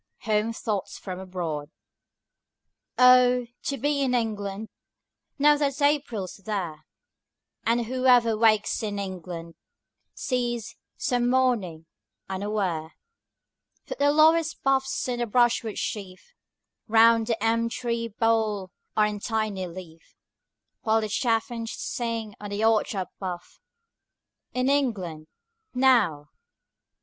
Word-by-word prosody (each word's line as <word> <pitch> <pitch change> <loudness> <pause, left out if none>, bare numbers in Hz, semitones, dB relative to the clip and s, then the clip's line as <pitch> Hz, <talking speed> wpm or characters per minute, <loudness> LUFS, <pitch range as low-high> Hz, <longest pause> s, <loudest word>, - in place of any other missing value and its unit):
HOME 215 +1 +1
THOUGHTS, 215 -3 -3
FROM 185 -2 -7
ABROAD 170 -6 -4 1.3
Oh, 250 0 +6 0.2
to 275 - -3
be 285 +2 0
in 255 -2 +1
England 215 -2 -2 0.7
Now 295 +1 +5
that 285 -1 -1
April's 285 -10 0
there, 180 -7 -5 0.8
And 235 +1 +2
whoever 250 -2 +3
wakes 215 -1 +2
in 205 -2 -3
England 180 -4 -6 0.6
Sees, 240 -3 -2 0.2
some 245 -1 0
morning, 230 -11 +1 0.4
unaware, 190 -5 -2 0.9
That - - -5
the 285 0 +4
lowest 315 +1 +3
boughs 270 -1 +1
and 245 -1 -2
the 240 - 0
brushwood 235 -1 +2
sheaf 200 - -5 0.5
5 220 - -13
Round 225 0 +6
the 225 -3 -1
elm 230 +1 +2
tree 235 -1 -3
hole 220 -4 +1 0.3
are 215 - +5
in 210 -1 -3
tiny 215 -4 -2
leaf, 170 -2 -12 0.7
While 220 0 +2
the 215 - -3
chaffinch 230 0 -1
sings 230 -3 -3
on 205 - -7
the 205 +2 -1
orchard 215 -4 +1
bough 185 -2 -3 1.2
In 255 +1 +1
England 200 - -1 0.5
now! 215 - +3
225 Hz, 115 wpm, -26 LUFS, 195-250 Hz, 1.3 s, Oh